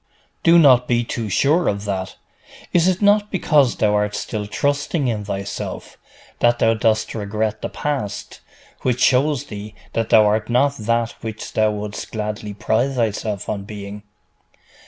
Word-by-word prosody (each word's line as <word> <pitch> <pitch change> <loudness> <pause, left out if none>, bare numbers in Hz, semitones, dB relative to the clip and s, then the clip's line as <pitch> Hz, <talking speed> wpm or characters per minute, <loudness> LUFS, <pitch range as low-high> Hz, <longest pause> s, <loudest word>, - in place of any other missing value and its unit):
'Do 170 +1 +6
not 130 -6 +6
be 120 -1 +2
too 115 -2 -4
sure 150 - +2
of 100 0 -1
that. 95 -2 -3 0.6
Is 175 0 +4
it 185 +2 +1
not 205 +1 +4
because 150 -8 +2
thou 105 -1 +2
art 105 0 0
still 105 0 -4
trusting 145 +4 -1
in 110 -3 -1
thyself, 100 0 -5 0.4
that 120 0 +3
thou 115 -1 +3
dost 110 0 0
regret 105 0 -2
the - - -3
past, 135 -9 -4 0.4
which 125 -1 0
shows 135 +1 +3
thee 105 0 -9 0.2
that 115 -1 -1
thou 110 -1 +6
art 105 +1 +1
not 140 +4 +2
that 115 +1 0
which 110 -1 -6
thou 110 0 +3
wouldst 105 -1 -5
gladly 105 -1 -4
pride 115 +6 0
thyself 110 -4 -2
on 100 -2 -3
being? 100 0 -8
110 Hz, 155 wpm, -21 LUFS, 105-130 Hz, 0.6 s, Do